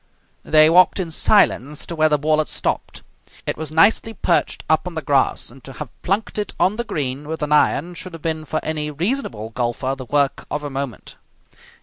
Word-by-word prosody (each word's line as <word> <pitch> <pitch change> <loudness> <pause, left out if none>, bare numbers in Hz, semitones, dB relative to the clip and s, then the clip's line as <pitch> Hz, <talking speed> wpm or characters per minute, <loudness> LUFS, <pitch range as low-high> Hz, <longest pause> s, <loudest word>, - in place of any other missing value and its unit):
They 155 0 +6
walked 180 +4 +5
in 175 -3 -3
silence 150 - +2
to 170 - -5
where 155 0 +3
the 150 - +3
ball 155 +1 +1
had 155 - 0
stopped. - - -3 0.4
It - - -1
was 155 -1 -5
nicely 205 +7 +3
perched 170 - 0
up 160 +3 +2
on 175 - -6
the 160 - -3
grass, 135 -3 +1
and 130 +1 -16
to 135 - -9
have - - -7
plunked 205 +3 -1
it 205 - -4
on 185 - +4
to 210 - -9
the 235 - -1
green 145 - -3
with 160 0 -4
an 150 - -3
iron 150 +3 +2
should 180 +1 -7
have 165 - -9
been 160 -1 -2
for 155 +1 -2
any 155 -1 -2
reasonable 150 - -2
golfer 120 +3 -2
the 130 -1 -8
work 140 +1 0
of 150 0 -3
a 145 - -5
moment. 135 -4 -6
155 Hz, 215 wpm, -21 LUFS, 140-170 Hz, 0.4 s, They